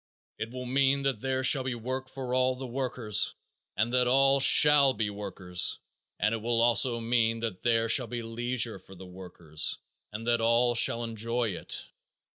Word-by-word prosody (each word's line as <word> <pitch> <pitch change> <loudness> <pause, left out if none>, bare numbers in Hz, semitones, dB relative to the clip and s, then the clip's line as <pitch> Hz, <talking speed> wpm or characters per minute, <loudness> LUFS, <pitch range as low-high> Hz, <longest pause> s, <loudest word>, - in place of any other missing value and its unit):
It 110 - -4
will 125 +1 -8
mean 135 +2 +1
that 135 -5 -1
there 130 0 -2
shall 135 +1 +5
be 130 -1 -3
work 130 +3 -5
for 130 -2 -6 0.2
the 130 +1 -8
workers 125 -4 -2 0.4
and 115 +3 0
that 125 -1 +2
all 135 +2 +3
shall 140 -1 +5
be 105 -2 -2
workers, 95 -3 -3 0.4
and 110 - 0
it 115 - -3
will 115 +1 -1
also 120 +1 +2
mean 115 -1 0
that 110 -6 -5
there 115 -1 +1
shall 120 +1 +2
be 120 -1 -5
leisure 115 -1 -2
for 95 +1 -16
the 95 +1 -12
workers 90 -4 -3 0.3
and 110 +2 -7
that 120 -1 +1
all 120 +1 +2
shall 115 0 +3
enjoy 115 +1 -2
it. 90 - -4
120 Hz, 175 wpm, -28 LUFS, 110-130 Hz, 0.4 s, shall